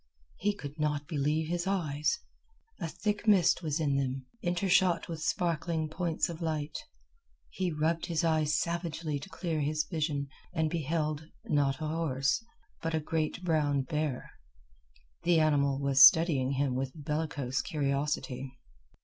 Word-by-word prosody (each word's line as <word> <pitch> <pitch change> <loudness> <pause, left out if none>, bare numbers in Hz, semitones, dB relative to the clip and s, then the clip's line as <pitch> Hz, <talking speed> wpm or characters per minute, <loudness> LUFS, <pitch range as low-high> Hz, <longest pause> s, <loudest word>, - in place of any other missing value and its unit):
He 205 +1 0
could 145 -4 -8
not 150 -1 0
believe 150 +1 0
his 175 +2 -2
eyes. 150 -6 0 0.6
A 170 - -2
thick 205 +6 -2
mist 190 -5 +5
was 155 -2 -1
in 140 -3 +1
them, 135 -1 -2 0.2
intershot 180 0 +2
with 165 -2 -5
sparkling 165 0 0
points 165 0 0
of 170 0 -7
light. 155 -2 -2 0.8
He 185 -2 -1
rubbed 160 +2 0
his 165 -2 0
eyes 155 -2 +2
savagely 165 -3 -2
to 145 - -10
clear 170 -5 -2
his 155 +1 0
vision, 150 -4 -2 0.3
and 160 -2 +1
beheld, 155 -1 -1 0.2
not 140 -3 +1
a 155 - -1
horse, 150 0 0 0.4
but 165 0 -1
a - - +2
great 155 +3 -2
brown 150 -5 +1
bear. 150 -3 -3 0.9
The 170 -1 +4
animal 140 -3 +3
was 140 -1 +5
studying 145 -4 +6
him 135 -1 0
with 130 +1 -2
bellicose 150 -3 -2
curiosity. 140 -2 -2
155 Hz, 140 wpm, -30 LUFS, 145-165 Hz, 0.9 s, studying